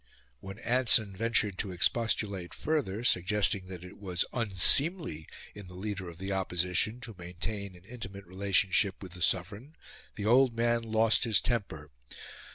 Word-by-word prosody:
When 95 +7 -9
Anson 115 -4 +3
ventured 105 -2 0
to 100 - -2
expostulate 100 -1 0
further, 130 -9 -1
suggesting 100 -2 +1
that 90 -2 -8
it 90 - -12
was 90 -3 -1
unseemly 115 - +1 0.3
in 100 -2 -10
the 90 - -12
leader 95 -1 -4
of 85 - -11
the 95 +2 -4
Opposition 90 +4 0
to 120 -3 -7
maintain 95 +3 -5
an 90 - -16
intimate 100 -4 -8
relationship 95 +1 +1
with 95 - -9
the 90 0 -9
Sovereign, 100 - -1 0.4
the 105 - -4
old 125 +1 +5
man 120 0 +2
lost 110 -1 +3
his 115 -4 +3
temper. 95 - -3
100 Hz, 150 wpm, -30 LUFS, 90-115 Hz, 0.4 s, old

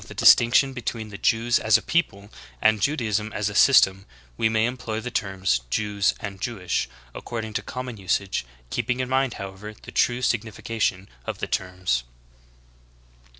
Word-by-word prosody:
the - - -10
distinction 120 +3 +6
between 115 -3 -4
the 100 - -8
Jews 115 +2 +2
as 110 -1 +5
a - - -7
people 105 -12 -1 0.3
and 110 -1 +3
Judaism 110 -5 0
as 105 0 -1
a - - -7
system, 95 -6 +5 0.3
we 110 - +2
may 110 0 +2
employ 120 -3 -3
the 125 +2 -6
terms 95 - 0
"J^^s" 105 - +1
and 100 -2 -7
"Jewish" 90 - -2 0.2
according 110 -2 -5
to - - -1
common 125 -2 -6
usage, 95 -3 -1 0.3
keeping 125 +1 -1
in 130 -1 -2
mind, 130 -2 +1
however, 100 +2 -8
the - - -11
true 125 +1 +1
signification 110 -4 -1 0.2
of - - -3
the - - -3
terms. 90 -10 -1
110 Hz, 155 wpm, -24 LUFS, 100-120 Hz, 0.3 s, distinction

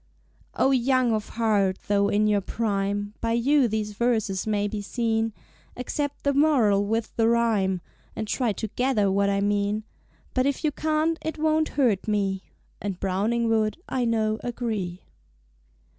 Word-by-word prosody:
O 270 - +3
Young 255 -1 +3
of 215 -1 -2
Heart, 205 -4 +1
tho' 200 0 +2
in 210 +1 +2
your 210 -1 +2
prime, 205 -1 -2
By 230 0 0
you 260 +3 +3
these 215 -1 -2
Verses 220 -4 0
may 205 -1 +1
be 205 0 -4
seen! 225 +1 -1 0.5
Accept 285 +3 -3
the 280 - +2
Moral 260 -9 +4
with 225 +1 -2
the 225 0 +4
Rhyme, 215 -6 +2 0.3
And 220 - -4
try 240 0 0
to 220 +2 -4
gather 225 -5 +1
what 200 +1 +2
I 200 0 +1
mean. 205 +1 0 0.5
But, 255 +1 +2
if 280 +3 -2
you 305 - +2
can't, 315 +2 0
it 315 - -4
won't 310 0 +2
hurt 230 -9 +2
me! 195 -3 0 0.4
(And 195 -3 -4
Browning 210 +5 0
would, 220 +1 +1
I 255 -2 -1
know, 220 -1 +1
agree.) 215 -7 -3
220 Hz, 160 wpm, -25 LUFS, 205-250 Hz, 0.5 s, Moral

